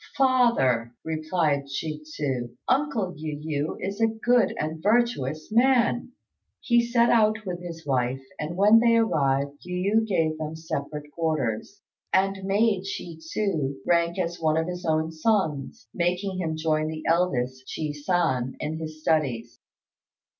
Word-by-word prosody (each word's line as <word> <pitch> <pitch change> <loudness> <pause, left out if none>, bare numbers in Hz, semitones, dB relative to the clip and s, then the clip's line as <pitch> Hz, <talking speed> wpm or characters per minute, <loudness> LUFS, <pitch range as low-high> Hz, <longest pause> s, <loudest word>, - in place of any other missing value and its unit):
"Father," 235 - +3
replied 155 -2 0
Chi 155 -1 -4
tsu, 130 -6 -4
"uncle 260 -9 +1
Yu 150 -1 -5
yü 150 0 -3
is 200 +3 -4
a 225 - +5
good 235 +2 +2
and 155 +1 -3
virtuous 205 - +1
man." 245 +1 +3 0.5
He 240 -1 +3
set 235 0 +3
out 220 -1 +3
with 180 -2 -4
his 165 -2 -8
wife, 130 -1 0 0.2
and 155 +3 -4
when 210 +3 +7
they 230 0 +4
arrived 140 -10 +1
Yu 180 +4 0
yü 220 - -4
gave 160 -6 0
them 155 0 -4
separate 150 -2 -5
quarters, 155 - -2 0.3
and 195 0 +1
made 200 0 +2
Chi 175 -4 -6
tsu 160 -4 -2
rank 170 0 +2
as 175 -2 -2
one 155 -1 +2
of 160 - +1
his 180 0 -5
own 160 0 +1
sons, 160 - -1
making 180 +2 -1
him 160 -3 -2
join 155 -1 0
the 155 0 -5
eldest, 130 -7 0
Chi 155 -2 -2
san, 145 -4 0
in 155 +1 -3
his 155 -1 -7
studies. 130 -8 0
160 Hz, 145 wpm, -26 LUFS, 150-200 Hz, 0.5 s, when